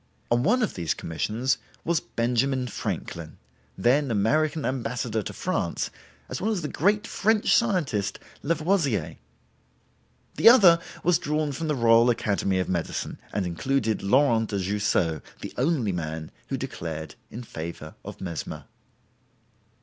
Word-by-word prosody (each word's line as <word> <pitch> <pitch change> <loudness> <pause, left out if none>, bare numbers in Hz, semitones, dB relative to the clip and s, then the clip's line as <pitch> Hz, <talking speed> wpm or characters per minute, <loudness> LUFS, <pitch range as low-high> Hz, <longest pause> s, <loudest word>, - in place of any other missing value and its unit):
On 120 0 +4
one 240 - +3
of - - -1
these 85 -6 -1
commissions 115 +10 -1 0.3
was 170 -1 +2
Benjamin 125 +2 0
Franklin, 85 -9 -5 0.4
then 135 +3 +3
American 150 +9 +1
Ambassador 125 -3 -1
to - - -5
France - - -2 0.4
as 130 - -5
well 210 - +1
as 200 -7 -1
the - - -1
great 205 +9 +1
French 215 0 +2
scientist 150 - +1 0.2
Lavoisier. 160 - 0 1.2
The - - +9
other 190 -9 +8 0.2
was 175 -2 +4
drawn 150 0 -1
from 155 +4 -4
the 150 - +1
Royal 115 -1 +5
Academy 100 -4 +1
of 95 - 0
Medicine, 85 -3 -3
and 100 - -1
included 110 +5 0
Laurent 115 +1 +3
de 100 - -1
Jussieu, 95 -4 0 0.2
the - - -6
only 130 -6 +1
man 80 -2 -4 0.2
who - - -2
declared 80 -2 -5 0.2
in 120 - -7
favor 80 -6 -7
of - - -8
Mesmer. 85 -4 -5
120 Hz, 135 wpm, -26 LUFS, 100-155 Hz, 1.2 s, The